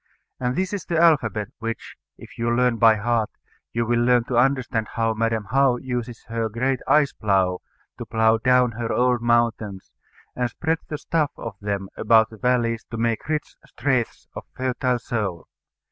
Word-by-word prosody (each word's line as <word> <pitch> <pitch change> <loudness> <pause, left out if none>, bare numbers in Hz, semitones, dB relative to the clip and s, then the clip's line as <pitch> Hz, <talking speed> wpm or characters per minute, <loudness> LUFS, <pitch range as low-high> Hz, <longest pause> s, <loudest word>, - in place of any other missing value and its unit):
And 125 0 -1
this 185 +4 -1
is 200 - -3
the 170 - -1
alphabet, 130 -11 +3
which, 115 0 -5 0.2
if - - -14
you 115 0 0
learn 120 0 +2
by 115 -1 +6
heart, 110 0 0 0.4
you 115 0 -1
will 120 +1 +1
learn 125 -1 +4
to 125 - -4
understand 120 -3 +1
how 115 -1 +1
Madam 110 -2 -1
How 135 -2 +3
uses 120 -2 -5
her 115 -1 -2
great 130 +4 -1
ice 150 -2 +4
plough 95 -4 +1 0.4
to - - -5
plough 110 0 +3
down 125 0 +3
her 115 0 -4
old 125 -1 +2
mountains, 115 -4 0 0.4
and 125 -1 -1
spread 160 +6 -1
the 150 - -4
stuff 155 -1 0
of 115 - -6
them 100 -1 -2
about 110 -1 +4
the 110 - -11
valleys 115 -1 +1
to 115 - -5
make 115 +3 -1
rich 155 -1 -2
straths 130 -3 -1
of - - -8
fertile 125 -1 0
soil. 105 -8 -3
120 Hz, 175 wpm, -23 LUFS, 110-125 Hz, 0.4 s, by